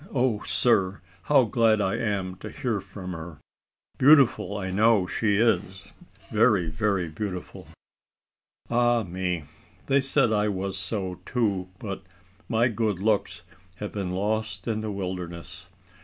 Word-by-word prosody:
O 120 -5 +1
sir! 100 -5 +2 0.3
how 140 -3 +5
glad 115 -1 +3
I 95 -2 +1
am 100 -4 -1
to 105 - -8
hear 120 -5 -2
from 95 -1 -8
her! 80 -1 -8 0.6
Beautiful 130 -7 +5
I 95 -2 -3
know 105 0 +4
she 105 +2 +1
is 100 -4 0 0.4
very, 105 -7 +3
very 95 +1 0
beautiful. 90 +3 -6 1.0
Ah 120 -1 +2
me! 90 -2 -3 0.4
they 140 0 +3
said 130 -4 +2
I 105 0 +2
was 95 -1 -2
so 95 -1 -3
too, 100 -5 -1
but 100 -2 -6 0.5
my 115 +1 +3
good 110 -4 -1
looks 105 +1 0 0.3
have 105 +2 -6
been 100 -3 -3
lost 105 0 -2
in 110 -1 -1
the 110 -1 -3
wilderness. 90 -3 -6
105 Hz, 135 wpm, -26 LUFS, 95-115 Hz, 1.0 s, how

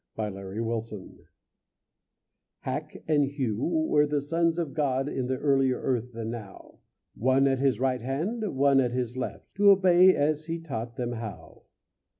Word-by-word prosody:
Hack 105 -2 -3
and 95 0 -8
Hew 115 -3 -5 1.4
Hack - - -5
and 150 -2 +3
Hew 130 -5 -2
were 155 -3 +2
the 145 0 0
sons 165 +3 0
of 160 -6 -2
God 135 -2 0
In 130 -3 -2
the 130 0 -1
earlier 135 -2 +2
earth 125 -1 -2
than 115 0 -4
now; 110 -5 -10 0.3
One 130 +3 +2
at 135 -1 +1
his 135 -4 +1
right 130 -1 0
hand, 170 - -3
one 140 0 +4
at 125 -2 +1
his 125 -1 -2
left, 130 - -6
To 205 0 +6
obey 185 -1 +6
as 150 +1 0
he 165 +1 -3
taught 120 -8 -6
them 120 -1 -3
how. 105 -9 -8
135 Hz, 160 wpm, -27 LUFS, 115-150 Hz, 1.4 s, To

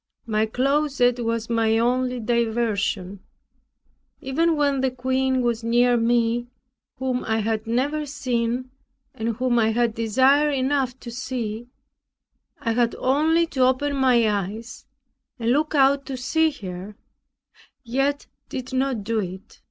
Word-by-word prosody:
My 220 -1 0
closet 265 0 +1
was 230 0 -2
my 225 -1 +2
only 250 +2 +1
diversion. 220 -4 -1 1.0
Even 320 +5 +1
when 280 -2 +1
the 265 - +2
queen 260 0 0
was 235 -1 -1
near 240 +1 +3
me, 235 0 +1 0.5
whom 255 -1 -2
I 220 0 0
had 220 0 -1
never 285 +6 -1
seen, 250 -2 -2 0.4
and 225 0 -3
whom 245 0 +1
I 220 -1 +3
had 235 -1 +1
desire 260 +7 +3
enough 265 -2 0
to 240 - -8
see; 240 -2 -4 0.9
I 230 - 0
had 235 0 +1
only 315 +6 +2
to 270 - -4
open 260 +3 +2
my 250 -4 +3
eyes, 210 +3 -4 0.5
and 235 -1 0
look 305 +4 +1
out 275 0 +3
to 265 - -4
see 320 +6 +2
her; 195 -6 -8 0.9
yet 275 +4 -1 0.2
did 260 0 -6
not 260 -4 0
do 225 +2 -1
it. 190 -1 -7
245 Hz, 135 wpm, -23 LUFS, 230-265 Hz, 1.0 s, near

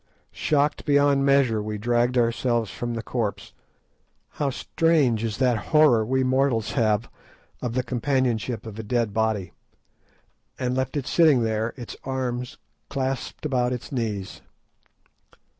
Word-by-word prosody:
Shocked 145 0 0
beyond 140 -1 +3
measure, 135 -6 +3
we 105 0 -4
dragged 120 +3 +1
ourselves 115 -2 +1
from 120 -1 -4
the 115 - -4
corpse—how 120 +5 -6
strange 135 -5 +1
is 110 -3 -2
that 125 -4 +1
horror 150 -8 +5
we 130 +4 +1
mortals 130 -4 +1
have 110 -2 +1 0.5
of 120 -1 -3
the 130 - +1
companionship 125 -3 -1
of 110 -1 -8
a - - -4
dead 115 -1 0
body—and 110 +4 -5
left 130 +2 -1
it 140 - -2
sitting 150 -8 +4
there, 110 +1 -1
its 120 -3 -7
arms 125 -2 -3 0.3
clasped 135 +2 -3
about 125 -3 +1
its 125 - -7
knees. 110 -7 -3
125 Hz, 125 wpm, -24 LUFS, 110-135 Hz, 0.5 s, horror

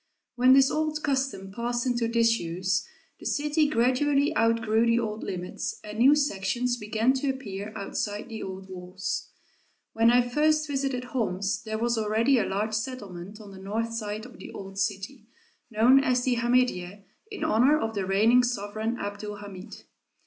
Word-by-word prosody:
When 255 +1 +6
this 270 0 +5
old 310 0 -1
custom 265 -9 -1
passed 240 +3 -2
into 240 -2 0
disuse, 190 -6 +1 0.3
the - - -12
city 300 +1 +1
gradually 280 +4 +2
outgrew 225 -1 +2
the 230 0 +3
old 220 -2 -2
limits 180 -1 -5
and 210 +1 -7
new 270 +5 +7
sections 245 -2 0
began 220 +3 +1
to 270 +1 -1
appear 210 -6 -5
outside 205 +1 -4
the 225 -2 -7
old 190 0 -7
walls. 185 0 -5 0.6
When 225 +1 +4
I 245 0 +4
first 305 +4 +2
visited 275 -3 -2
Homs, 205 -5 -2
there 220 -1 -4
was 235 0 0
already 225 +5 +2
a - - +1
large 210 +3 -1
settlement 210 -4 -5
on 205 -2 -11
the 190 - -11
north 220 +4 -3
side 215 -1 -4
of 250 - -13
the - - -9
old 195 0 -8
city, 205 +4 -3 0.4
known 245 +5 +5
as 250 -2 +1
the 250 -1 +1
Hamidiyeh 235 -6 0 0.3
in 415 -6 -6
honor 290 +1 +4
of 225 -4 -2
the 195 -3 -2
reigning 220 +6 +5
sovereign 220 -1 -2
Abd 205 -1 -5
ul 210 0 -5
Hamid. 205 0 -10
230 Hz, 165 wpm, -27 LUFS, 205-255 Hz, 0.6 s, new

